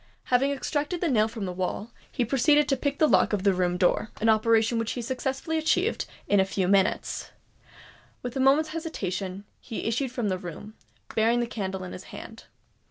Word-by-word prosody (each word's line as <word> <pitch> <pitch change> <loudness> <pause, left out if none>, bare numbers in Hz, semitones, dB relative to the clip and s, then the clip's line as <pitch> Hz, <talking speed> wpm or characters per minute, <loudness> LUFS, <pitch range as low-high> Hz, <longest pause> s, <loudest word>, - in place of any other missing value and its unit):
Having 265 +3 +4
extracted 295 +4 -2
the 345 - 0
nail 220 -7 +3
from 225 -3 -5
the 185 - -3
wall, 185 +5 -3 0.2
he 245 - 0
proceeded 290 +4 +3
to 275 - +2
pick 280 +2 -2
the 310 - +4
lock - - +3
of 200 -2 0
the 200 -1 +4
room 180 -1 0
door—an 210 +4 +1
operation 225 +1 +3
which 225 -1 -1
he 245 - -4
successfully 265 +5 -2
achieved 315 - +1 0.2
in 205 - +4
a - - +6
few 190 -1 -1
minutes. 195 +1 +1 0.9
Without 250 +2 -4
a - - +3
moment's 295 +4 +4
hesitation, 200 - -4
he 225 - -6
issued 245 +3 0
from 245 -4 -2
the 185 -1 -1
room, 185 +4 -8 0.4
bearing 230 +2 +3
the 240 - +1
candle 190 -5 -4
in 180 - -7
his 185 - -9
hand. 225 0 -10
225 Hz, 190 wpm, -27 LUFS, 195-270 Hz, 0.9 s, a